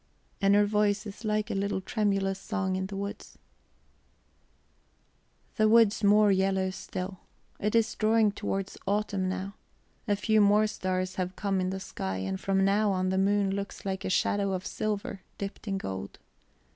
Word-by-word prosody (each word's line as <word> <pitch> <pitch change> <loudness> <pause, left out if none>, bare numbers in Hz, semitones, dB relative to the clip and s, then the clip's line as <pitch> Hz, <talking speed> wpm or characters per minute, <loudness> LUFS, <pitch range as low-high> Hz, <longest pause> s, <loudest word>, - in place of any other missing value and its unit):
And 200 0 +5
her 205 0 +5
voice 210 0 +1
is 205 +2 -9
like 215 -1 0
a - - -1
little 200 0 -1
tremulous 195 -1 0
song 190 -3 -2
in 190 0 -2
the 195 - -7
woods. 200 +1 -6 2.2
The 215 -1 +4
woods 220 -2 +5
more 205 0 +6
yellow 190 0 +1
still. 185 0 -6 0.4
It 210 +2 0
is 230 -1 +3
drawing 220 -1 +3
towards 195 -1 -4
autumn 200 -2 0
now; 190 +1 -4 0.5
a 205 - +3
few 215 +1 +3
more 205 +1 +5
stars 185 -3 -2
have 185 0 -2
come 195 -2 0
in 185 - 0
the 190 0 -3
sky, 95 - -4
and 95 0 -3
from 195 0 +1
now 205 +1 +3
on 185 -1 0
the 190 0 +1
moon 200 0 +2
looks 200 0 -5
like 190 -1 -3
a - - -2
shadow 200 +1 +1
of 185 0 -3
silver 215 0 -3 0.2
dipped 200 +2 -6
in 195 -1 -1
gold. 95 - -6
200 Hz, 170 wpm, -29 LUFS, 190-210 Hz, 2.2 s, more